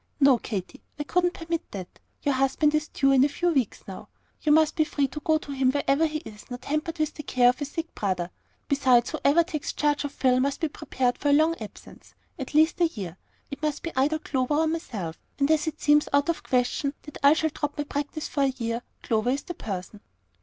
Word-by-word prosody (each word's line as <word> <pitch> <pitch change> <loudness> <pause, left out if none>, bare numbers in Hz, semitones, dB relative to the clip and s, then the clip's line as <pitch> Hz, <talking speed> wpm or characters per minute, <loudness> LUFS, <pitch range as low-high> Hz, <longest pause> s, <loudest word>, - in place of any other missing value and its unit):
"No, 275 -4 +6
Katy, 210 +6 -5 0.2
I 295 - -2
couldn't 355 +3 +1
permit 330 0 -2
that. 185 -3 -8 0.2
Your 285 - +2
husband 270 +3 +2
is 305 0 +1
due 275 -1 +2
in 265 -1 +6
a 290 - +3
few 350 +5 0
weeks 265 -9 -1
now. 190 - -9 0.3
You 300 - +2
must 315 0 +4
be 310 - +3
free 285 -2 0
to 300 - -6
go 315 +1 +2
to 290 - -8
him 265 -2 +2
wherever 285 +2 +2
he 310 0 -3
is, 210 +3 -11
not 245 0 -7
hampered 305 +3 -2
with 310 -1 0
the - - -7
care 250 -3 +4
of 250 - -1
a - - 0
sick 330 +3 -5
brother. 185 -3 -2 0.4
Besides, 255 -4 +3
whoever 310 +5 +3
takes 310 -3 -4
charge 295 -1 +1
of 285 - -3
Phil 255 -2 +2
must 275 +1 0
be 320 - 0
prepared 255 -3 -1
for 290 - +1
a - - +5
long 315 +3 +4
absence, 215 - -11 0.2
at 270 +2 -6
least 315 +3 +4
a 340 - +6
year. 195 - -7 0.4
It 280 - -7
must 300 -1 -2
be 335 - -5
either 280 +4 +2
Clover 270 -2 -1
or 320 +2 +3
myself; 220 - -4 0.2
and 280 +2 +2
as 315 0 +2
it 315 - -3
seems 295 0 +4
out 285 +2 +2
of 335 - +1
the - - -21
question 255 +3 +1
that 295 - -10
I 280 +1 +7
shall 315 -1 0
drop 295 0 -4
my 295 - 0
practice 290 +1 -4
for 285 - -2
a 275 - +4
year, 230 -1 -2 0.2
Clover 225 +1 +1
is 275 +3 0
the 350 - -6
person." 200 - -6
285 Hz, 235 wpm, -26 LUFS, 255-310 Hz, 0.4 s, I